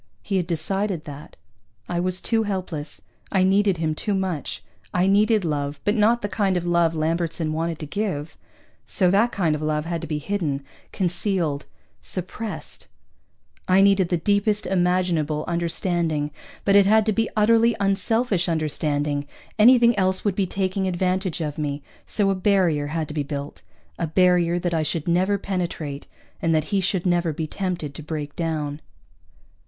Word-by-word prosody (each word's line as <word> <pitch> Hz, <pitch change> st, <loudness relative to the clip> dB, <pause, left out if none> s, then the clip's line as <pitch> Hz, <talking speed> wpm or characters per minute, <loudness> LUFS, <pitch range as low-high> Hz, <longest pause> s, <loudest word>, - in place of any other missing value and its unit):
He 195 Hz, -2 st, -1 dB
had 175 Hz, -2 st, -1 dB
decided 185 Hz, +1 st, -1 dB
that. 145 Hz, 0 st, -10 dB, 0.5 s
I 175 Hz, -, -2 dB
was 185 Hz, +1 st, -1 dB
too 225 Hz, -1 st, +1 dB
helpless. 185 Hz, -8 st, -4 dB, 0.3 s
I 190 Hz, -2 st, +3 dB
needed 195 Hz, 0 st, +3 dB
him 160 Hz, -1 st, 0 dB
too 200 Hz, +6 st, -1 dB
much. 185 Hz, -6 st, -3 dB, 0.3 s
I 180 Hz, +1 st, +3 dB
needed 210 Hz, +1 st, +3 dB
love, 145 Hz, -2 st, -2 dB
but 205 Hz, -, +3 dB
not 230 Hz, +2 st, +3 dB
the -, -, 0 dB
kind 195 Hz, -2 st, 0 dB
of 175 Hz, -, -3 dB
love 170 Hz, -1 st, +2 dB
Lambertson 160 Hz, 0 st, -1 dB
wanted 165 Hz, 0 st, -2 dB
to 155 Hz, -, -6 dB
give, 160 Hz, -3 st, -3 dB, 0.5 s
so 185 Hz, -3 st, +2 dB
that 220 Hz, +5 st, +3 dB
kind 175 Hz, -8 st, +1 dB
of 150 Hz, -, -3 dB
love 155 Hz, 0 st, -1 dB
had 170 Hz, -1 st, -3 dB
to 165 Hz, -, -6 dB
be 155 Hz, 0 st, -2 dB
hidden, 150 Hz, -4 st, -2 dB, 0.3 s
concealed, 175 Hz, -5 st, -1 dB, 0.3 s
suppressed. 200 Hz, +4 st, -6 dB, 0.8 s
I 185 Hz, +1 st, +5 dB
needed 195 Hz, -3 st, +4 dB
the 175 Hz, -, +1 dB
deepest 205 Hz, +4 st, +1 dB
imaginable 175 Hz, -5 st, +1 dB
understanding, 170 Hz, -3 st, -1 dB, 0.3 s
but 200 Hz, -, +4 dB
it 200 Hz, -1 st, +6 dB
had 220 Hz, +1 st, +5 dB
to 215 Hz, -, +1 dB
be 225 Hz, +2 st, 0 dB
utterly 230 Hz, +2 st, +4 dB
unselfish 195 Hz, 0 st, +1 dB
understanding, 150 Hz, -2 st, -1 dB, 0.3 s
anything 240 Hz, +1 st, +6 dB
else 185 Hz, +1 st, +1 dB
would 205 Hz, -, +2 dB
be 195 Hz, -2 st, 0 dB
taking 190 Hz, +1 st, -1 dB
advantage 185 Hz, -1 st, -1 dB
of 150 Hz, -1 st, -3 dB
me, 145 Hz, -1 st, -3 dB, 0.2 s
so 200 Hz, -2 st, +1 dB
a -, -, +2 dB
barrier 185 Hz, -6 st, +2 dB
had 155 Hz, +1 st, -2 dB
to -, -, -6 dB
be 150 Hz, -, -1 dB
built 140 Hz, 0 st, -5 dB, 0.4 s
a 170 Hz, -, 0 dB
barrier 175 Hz, 0 st, +3 dB
that 175 Hz, -1 st, -1 dB
I 160 Hz, -, +1 dB
should 155 Hz, +1 st, -2 dB
never 185 Hz, +4 st, +2 dB
penetrate 170 Hz, -7 st, -4 dB, 0.3 s
and 165 Hz, -1 st, +2 dB
that 155 Hz, -, +2 dB
he 195 Hz, -, +3 dB
should 185 Hz, -1 st, -1 dB
never 175 Hz, -2 st, +2 dB
be 155 Hz, +1 st, -3 dB
tempted 170 Hz, -3 st, -3 dB
to 155 Hz, -, -7 dB
break 150 Hz, -1 st, -5 dB
down. 155 Hz, -3 st, -3 dB
175 Hz, 170 wpm, -23 LUFS, 155-195 Hz, 0.8 s, it